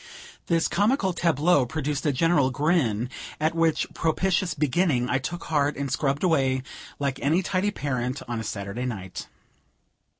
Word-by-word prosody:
This 165 -1 +2
comical 200 - +1
tableau 165 -2 +3
produced 150 +2 -2
a - - +4
general 145 -1 +3
grin, 130 - +1 0.3
at 155 +2 +1
which 165 -1 +2
propitious 175 +2 0
beginning 145 -3 +1
I 130 - +1
took 170 +6 -5
heart 145 -2 0
and 140 -1 -3
scrubbed 140 +2 0
away 135 -7 +2 0.3
like 140 -2 -2
any 165 +6 +2
tidy 190 +2 0
parent 130 -7 -3
on 120 -1 -3
a - - -4
Saturday 100 +3 -4
night. 95 -6 -6
145 Hz, 145 wpm, -25 LUFS, 130-170 Hz, 0.3 s, a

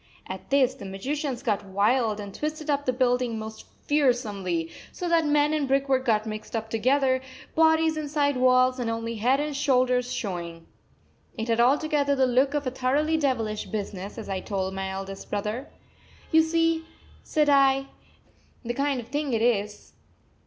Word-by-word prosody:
At 190 0 -8
this 265 -2 +3
the 265 - -12
magicians 260 +7 -3
got 210 -6 0
wild 210 +3 +1
and 200 -1 -7
twisted 305 0 -3
up 285 -1 -1
the - - +4
building 250 -2 +1
most 220 0 -8 0.2
fearsomely, 210 - 0 0.2
so 355 - -5
that 335 -2 +3
men 295 +1 +3
and 300 -3 0
brickwork 270 -1 +1
got 215 -2 +2
mixed 215 +1 -6 0.2
together, 260 +3 +2 0.3
bodies 320 0 +3
inside 290 -2 0
walls 255 0 +3
and 240 -2 -1
only 230 0 -3
head 250 +6 +2
and 295 -1 -2
shoulders 255 -3 +2
showing. 170 -5 -5 0.7
It 225 +1 -3
had 230 0 +2
altogether 285 +3 +3
the 265 -1 +3
look 260 +3 +2
of 290 -1 -1
a 255 - -1
thoroughly 280 +5 +1
devilish 235 -8 -1
business, 200 -1 -5
as 225 - -7
I 195 -1 -2
told 190 -1 -3
my 190 0 -3
eldest 195 0 -7
brother. 210 +6 -3 0.6
"You 320 - +6
see," 330 0 +1 0.4
said 300 -1 +1
I, 275 -1 +4 0.8
"the 240 - -2
kind 275 0 0
of 235 - -8
thing 290 -1 -2
it 225 - +1
is. 210 -3 -1
255 Hz, 165 wpm, -26 LUFS, 215-285 Hz, 0.8 s, You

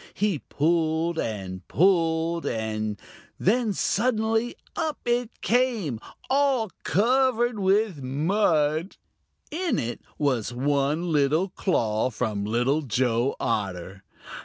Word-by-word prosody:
He 200 -6 0
pulled 160 +2 0
and 95 -4 -4
pulled, 165 -1 +2
and 110 -2 -2 0.4
then 225 +3 +2
suddenly 225 +3 0 0.2
up 315 -3 -1
it 240 -1 -1
came, 225 - +1 0.3
all 265 -6 +2
covered 240 +1 +2
with 195 -4 +2
mud. 155 +3 +1 0.5
In 340 +2 -1
it 120 +1 -3 0.2
was 130 -6 0
one 145 +5 0
little 155 +5 +2
claw 115 - 0
from 105 -3 -2
Little 120 +7 +1
Joe 125 0 0
Otter. 95 -5 -3
160 Hz, 100 wpm, -25 LUFS, -, 0.5 s, pulled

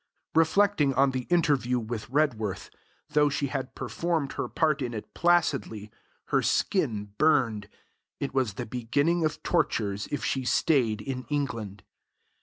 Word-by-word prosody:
Reflecting 160 -3 +3
on 135 +1 +4
the 130 -1 -4
interview 145 -8 +2
with 115 -2 -5
Redworth, 125 -8 -1 0.4
though 150 -1 +3
she 140 0 -1
had 135 -1 -4
performed 165 -5 -2
her - - -3
part 155 -3 +1
in 120 -2 -3
it 105 - -8
placidly, 145 -11 +1 0.4
her - - +3
skin 110 - 0
burned. 120 -10 +2 0.5
It 140 - -3
was 125 -7 0
the - - -4
beginning 140 +9 0
of 155 -1 -2
tortures 105 - 0
if 145 - -2
she 135 - -1
stayed 125 -6 +2
in 130 +3 -5
England. 115 -9 -3
135 Hz, 140 wpm, -27 LUFS, 115-155 Hz, 0.5 s, on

